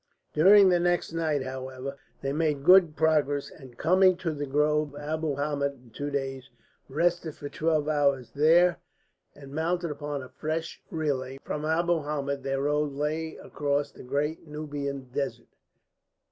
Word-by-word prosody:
During 195 +5 +7
the 175 -1 +3
next 175 -1 0
night, 155 -4 0
however, 130 +1 -6 0.3
they 135 0 -1
made 150 -2 0
good 180 -2 +6
progress, 145 -2 +1
and, 130 -5 -14
coming 185 +2 +4
to 170 -3 -2
the 145 -1 -4
groves 150 +1 +1
of - - -7
Abu 155 0 -2
Hamed 145 0 -2
in 125 -3 -20
two 145 +5 -4
days, 135 -2 -4 0.4
rested 165 +2 0
for 145 - -7
twelve 155 -1 0
hours 140 -4 +1
there 165 +4 +4 0.6
and 140 -1 -12
mounted 170 +2 -1
upon 145 -1 -4
a 130 - -11
fresh 160 +1 -4
relay. 135 -5 -2
From 150 0 -4
Abu 170 +1 +1
Hamed 140 -1 -3
their 135 0 -1
road 150 0 0
lay 155 +3 -2
across 145 0 -2
the - - -13
great 145 +5 -2
Nubian 145 -3 -5
Desert. 130 -5 -4
150 Hz, 155 wpm, -27 LUFS, 140-160 Hz, 0.6 s, During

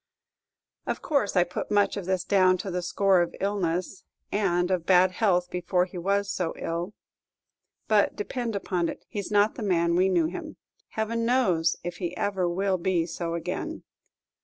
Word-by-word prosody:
Of - - -3
course 280 -11 0
I 180 - +5
put 175 - -5
much 205 -1 +2
of 200 - -5
this 185 -1 0
down 185 -2 +4
to 185 +2 -5
the 180 0 -2
score 190 +1 +3
of 170 - -2
illness, 185 -2 -2 0.3
and 180 -3 +1
of 180 -3 +1
bad 185 0 +5
health 180 -4 +1
before 180 0 +1
he 180 -1 -8
was 200 +2 0
so 180 -4 -2
ill; 170 +5 -4 0.9
but, - - +3
depend 245 - -3
upon 180 -3 -1
it, - - -8
he's 205 -2 -5
not 205 +1 +3
the - - -8
man 170 -4 +2
we 185 +2 +3
knew 175 -3 +3
him. 175 +3 -6 0.4
Heaven 230 +1 -1
knows 190 -10 +2
if 175 0 -5
he 175 -2 -4
ever 190 -3 0
will 190 +1 0
be 175 -2 +1
so 170 0 -4
again. 170 - -4
185 Hz, 175 wpm, -27 LUFS, 175-200 Hz, 0.9 s, I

